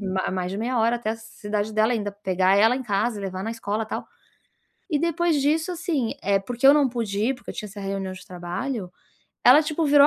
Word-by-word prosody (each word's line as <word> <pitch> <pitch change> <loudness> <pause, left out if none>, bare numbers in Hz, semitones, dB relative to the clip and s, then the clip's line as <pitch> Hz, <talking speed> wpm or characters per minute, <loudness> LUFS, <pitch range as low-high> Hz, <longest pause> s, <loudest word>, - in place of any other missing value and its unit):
ma 190 -2 -1
mais 185 -1 -2
de 195 - -4
meia 240 +2 -1
hora 230 +2 +3
até 235 -2 -3
a 225 - -3
cidade 215 -1 -4
dela, 215 +2 +3
ainda 210 -3 -1
pegar 190 -1 +2
ela 225 +4 +5
em 265 - -4
casa, 210 +1 0
levar 190 -1 -4
na 225 - -2
escola, 220 -1 -2
tal. - - -4 0.9
E 300 - +2
depois 335 -1 +1
disso, 315 +5 +1
assim, 325 -9 -1
eh, 200 0 +3
porque 240 +6 0
eu 280 - +9
não 290 -3 +4
pude 230 -5 -3
ir, 235 +6 +1
porque 250 - -10
eu - - -8
tinha 210 - -5
essa 205 +1 -9
reunião 195 -1 -3
de 185 - -10
trabalho, 180 +3 -4 0.5
ela 305 - +8
tipo 315 +1 -1
virou 285 0 +7
220 Hz, 225 wpm, -24 LUFS, 195-270 Hz, 0.9 s, eu